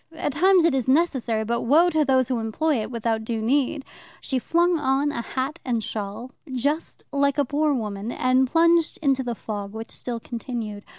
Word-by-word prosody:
At 305 -3 -3
times 365 +3 +4
it 335 - +3
is 260 -3 -1
necessary, 260 -7 +1
but 235 +1 -1
woe 320 +8 +4
to 315 -2 +2
those 260 -3 +2
who 250 -3 -1
employ 235 +4 0
it 215 - -5
without 230 -2 -1
due 225 0 -3
need. 270 +4 0 0.3
She 265 -2 -2
flung 340 +5 +2
on 280 +1 +1
a 235 - -3
hat 265 +6 -4
and 235 -4 -1
shawl, 215 +4 -5 0.2
just 285 +6 -2
like 280 0 +2
a 285 - +2
poor 295 +3 +1
woman, 210 -1 -4
and 255 +1 +2
plunged 335 +1 +3
into 270 -2 +2
the 240 -2 -3
fog, 205 -2 -6
which 225 +1 -7
still 240 -2 -5
continued. 230 -3 -6
260 Hz, 190 wpm, -24 LUFS, 230-295 Hz, 0.3 s, times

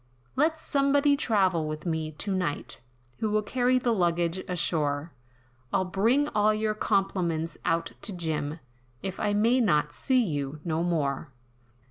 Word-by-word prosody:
"Let 315 +3 +2
somebody 285 -1 +3
travel 190 - +2
with 155 +1 -5
me 160 -2 -2
to 195 +6 -3
night, 175 -6 -3 0.4
Who 220 - 0
will 210 0 +1
carry 250 +3 +2
the 240 -2 +1
luggage 175 -2 +1
ashore, 160 -3 -1 0.6
I'll 185 - +1
bring 230 +10 +2
all 215 0 +3
your 215 0 0
compliments 185 -6 0
out 165 -1 0
to 210 - -4
Jim, 160 -4 -3 0.5
If 190 -1 -4
I 205 -1 +1
may 230 +5 +3
not 150 -10 +2
see 255 -2 +2
you 145 -5 -3
no 160 -1 0
more." 155 -4 -1
185 Hz, 145 wpm, -27 LUFS, 160-220 Hz, 0.6 s, somebody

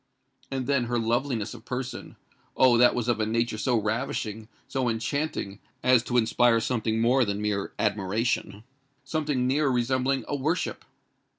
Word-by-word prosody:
And 135 -2 -3
then 140 -3 +1
her 120 0 -1
loveliness 115 -1 -1
of 115 -2 -11
person—Oh! 125 0 -1
that 125 +1 +5
was 120 -1 -2
of 120 -2 +1
a 110 - +1
nature 115 0 -1
so 120 +1 +2
ravishing, 110 -1 -3 0.2
so 130 -3 -1
enchanting, 115 -3 -2 0.2
as 125 -1 +5
to 125 - 0
inspire 115 0 +3
something 115 -1 -1
more 125 +3 +4
than 100 -2 -2
mere 105 -2 -2
admiration—something 125 - -2
nearer 140 +2 +2
resembling 130 +2 0
a 145 - -2
worship. 155 +6 -2
120 Hz, 140 wpm, -27 LUFS, 110-130 Hz, 0.2 s, that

